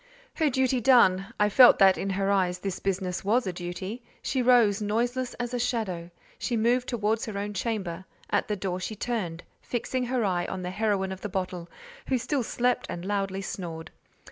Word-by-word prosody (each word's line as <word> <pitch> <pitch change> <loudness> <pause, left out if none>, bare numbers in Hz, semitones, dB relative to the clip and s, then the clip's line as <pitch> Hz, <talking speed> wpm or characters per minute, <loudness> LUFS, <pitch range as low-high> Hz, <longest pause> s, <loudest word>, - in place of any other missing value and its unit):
Her 315 -3 +1
duty 260 -1 +1
done—I 210 -4 +4
felt 245 +4 +8
that 190 -1 +6
in 195 - -3
her 195 +1 0
eyes 185 -2 +1
this 185 0 -4
business 185 -2 -2
was 225 +5 +2
a 185 - -2
duty—she 190 +9 -5
rose, 235 -5 +4
noiseless 240 +4 -1
as 245 0 -4
a 245 - -1
shadow: 205 -8 -2 0.3
she 240 - -1
moved 245 +3 +2
towards 220 -1 0
her 210 -2 -4
own 205 +1 -3
chamber; 190 -4 -3 0.3
at - - +1
the 210 - -1
door, 185 -2 -3
she 215 +4 -4
turned, 190 -7 -3 0.2
fixing 250 +1 -2
her 245 -2 0
eye 175 -2 0
on 185 -1 -5
the 180 - -3
heroine 200 -2 0
of 190 0 -7
the 210 - -4
bottle, 180 -3 -4 0.4
who 260 - +2
still 255 +3 -1
slept 245 +1 0
and 175 +1 -5
loudly 195 -1 -2
snored. 165 -4 -6
205 Hz, 185 wpm, -27 LUFS, 185-240 Hz, 0.4 s, felt